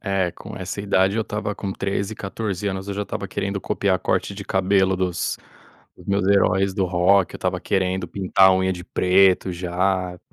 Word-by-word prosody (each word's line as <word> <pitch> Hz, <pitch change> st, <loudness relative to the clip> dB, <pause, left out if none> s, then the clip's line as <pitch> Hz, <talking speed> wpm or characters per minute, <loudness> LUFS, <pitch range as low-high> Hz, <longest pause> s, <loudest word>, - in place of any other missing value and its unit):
é 95 Hz, -4 st, 0 dB
com -, -, -10 dB
essa 95 Hz, +2 st, -5 dB
idade 100 Hz, 0 st, +2 dB
eu 115 Hz, -, +1 dB
estava 105 Hz, -1 st, -4 dB
com 100 Hz, -1 st, -4 dB
13, 100 Hz, +2 st, -2 dB
14 100 Hz, -1 st, -4 dB
anos, 95 Hz, 0 st, -3 dB
eu 100 Hz, -, -3 dB
já 105 Hz, -, -2 dB
estava 100 Hz, -1 st, -5 dB
querendo 100 Hz, 0 st, -3 dB
copiar 95 Hz, -1 st, 0 dB
corte 100 Hz, -, -1 dB
de 100 Hz, 0 st, -7 dB
cabelo 95 Hz, 0 st, +2 dB
dos 90 Hz, -1 st, -2 dB, 0.6 s
dos -, -, -16 dB
meus 100 Hz, -1 st, +1 dB
heróis 100 Hz, -1 st, +3 dB
do 95 Hz, -2 st, +1 dB
rock. 90 Hz, +2 st, +3 dB
Eu -, -, -6 dB
estava -, -, -1 dB
querendo 95 Hz, -1 st, -1 dB
pintar 95 Hz, 0 st, +3 dB
a 95 Hz, -, +5 dB
unha 95 Hz, 0 st, +1 dB
de 90 Hz, -1 st, -7 dB
preto, 95 Hz, 0 st, +3 dB
já. 90 Hz, +1 st, -1 dB
95 Hz, 190 wpm, -22 LUFS, 95-100 Hz, 0.6 s, a